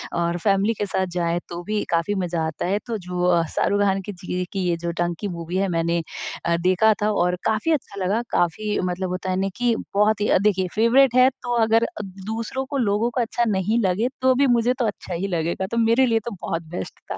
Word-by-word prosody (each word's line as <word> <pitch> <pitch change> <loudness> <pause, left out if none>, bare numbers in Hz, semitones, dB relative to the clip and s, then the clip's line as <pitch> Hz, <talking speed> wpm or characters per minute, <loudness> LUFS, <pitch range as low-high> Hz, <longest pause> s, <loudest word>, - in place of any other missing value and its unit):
और 170 0 0
फैमिली 200 +2 +3
के 205 - -3
साथ 190 -1 0
जाएँ 170 -1 0
तो 175 0 -5
भी 210 +3 -1
काफ़ी 170 +4 0
मजा 175 -3 -1
आता 160 - -4
है। 195 +3 +1
तो 230 - -2
जो 180 -2 -4
अ, 175 -2 +4
शाहरुख 205 +1 +2
खान 195 -1 +2
की 205 - -6
जी 180 -1 -7
ये 180 0 -1
की 195 - -2
ये 170 - +2
जो 170 0 -3
डंकी 175 +3 -1
मूवी 170 -1 -4
है 195 0 +1
मैंने 170 0 0 0.4
अ, 170 0 +2
देखा 185 +4 +4
था 210 +1 +2
और 180 -3 +1
काफ़ी 220 +8 +1
अच्छा 200 -10 -2
लगा। 200 +5 +1
काफ़ी 205 +5 0
मतलब 180 +1 -3
होता 185 +1 -3
है 185 - +1
ना 195 0 0
कि 245 -1 +2 0.2
बहुत 210 +1 +3
ही 210 - +2
अ, - - +5
देखिए 190 -2 +1
फ़ेवरेट 240 +3 +4
है 255 +1 +7
तो 245 - -2
अगर 225 +1 +3
अ, 225 - -4
दूसरों 220 +7 -5
को, 280 +1 -4
लोगों 220 -1 +1
को 250 - 0
अच्छा 235 +1 0
नहीं 210 +3 +1
लगे 190 +6 +1
तो 260 0 +5
भी 275 +1 +3
मुझे 240 0 +3
तो 240 - +2
अच्छा 190 -2 -5
ही 180 +3 -2
लगेगा। 170 +1 -1
तो 230 - -2
मेरे 230 +3 +4
लिए 225 -2 +2
तो 235 - -3
बहुत 165 0 -3
बेस्ट - - -6
था। - - -3
200 Hz, 240 wpm, -23 LUFS, 180-225 Hz, 0.4 s, है